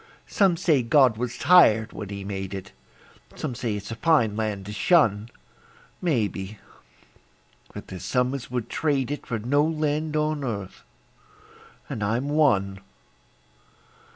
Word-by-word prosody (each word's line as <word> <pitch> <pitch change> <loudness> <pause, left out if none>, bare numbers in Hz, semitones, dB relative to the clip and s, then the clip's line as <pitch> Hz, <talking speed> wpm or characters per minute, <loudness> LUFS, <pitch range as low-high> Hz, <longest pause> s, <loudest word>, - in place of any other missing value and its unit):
Some 190 -4 +2
say 160 -6 +2
God 125 0 +4
was 120 +1 -4
tired 115 -10 +5
when 105 -3 -7
He 100 -1 -6
made 95 -1 -5
it; 95 0 -8 0.6
Some 145 -5 -4
say 115 -2 -3
it's 105 +2 -7
a - - -4
fine 120 -7 +2
land 105 -3 -3
to 105 - -7
shun; 110 - +2 0.7
Maybe; 110 - -1 1.1
but - - -9
there's 95 - -8
some 125 0 0
as 135 -4 -6
would 120 -2 -3
trade 140 -3 -1
it 145 - -5
For 115 - -2
no 135 +7 +1
land 155 -1 -1
on 150 -1 -1
earth 100 -7 -5 1.1
and 105 - -4
I'm 115 +7 -1
one. 100 -11 +2
120 Hz, 140 wpm, -25 LUFS, 105-150 Hz, 1.1 s, tired